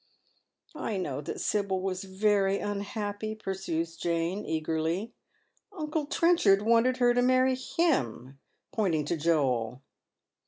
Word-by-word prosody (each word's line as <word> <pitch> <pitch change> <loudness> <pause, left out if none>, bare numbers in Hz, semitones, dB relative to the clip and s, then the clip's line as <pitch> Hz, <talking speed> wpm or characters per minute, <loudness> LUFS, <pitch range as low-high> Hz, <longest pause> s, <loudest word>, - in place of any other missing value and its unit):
' - - -41 0.2
" - - -30
I 230 -9 -3
know 145 -7 -3
that 145 - -5
Sibyl 200 -2 0
was 185 0 -3
very 195 0 +2
unhappy," 205 +1 -3
pursues 185 -5 -3
Jane, 170 +4 -1
eagerly. 160 +6 -1 0.3
*' - - -43
Uncle 305 -1 -2
Trenchard 290 - +4
wanted 235 +3 +3
her 245 -1 +4
to 245 - +2
marry 255 +1 +4
him," 145 - -1 0.3
pointing 170 -9 0
to - - -1
Joel. 135 -6 0
195 Hz, 130 wpm, -29 LUFS, 165-230 Hz, 0.3 s, Trenchard